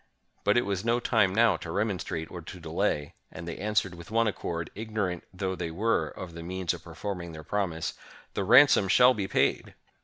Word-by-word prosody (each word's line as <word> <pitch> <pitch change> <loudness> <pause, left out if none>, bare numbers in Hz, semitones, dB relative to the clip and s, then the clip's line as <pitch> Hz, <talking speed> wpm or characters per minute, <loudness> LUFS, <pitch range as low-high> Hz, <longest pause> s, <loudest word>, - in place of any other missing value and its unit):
But 105 +3 +3
it 120 - +3
was 100 -1 -2
no 120 +1 +2
time 110 -5 +3
now 115 +3 +4
to 80 - -8
remon 100 0 -1
strate 80 0 -5
or - - -7
to - - -10
delay; 75 -1 -1 0.2
and 85 +1 -8
they 85 - -5
answered 100 -2 0
with 85 0 -11
one 115 +1 +2
accord, 85 -5 -3
ignorant 105 -5 -3
though 95 0 -2
they 90 -2 -4
were 105 +8 +1
of 90 -3 -8
the 85 - -8
means 90 0 -2
of - - -9
performing 90 -5 -5
their 80 0 -9
promise, 85 -3 -2 0.4
"The 100 - -1
ransom 120 +1 +7
shall 125 +6 +6
be 100 -5 -3
paid!" - - 0
95 Hz, 205 wpm, -28 LUFS, 85-110 Hz, 0.4 s, ransom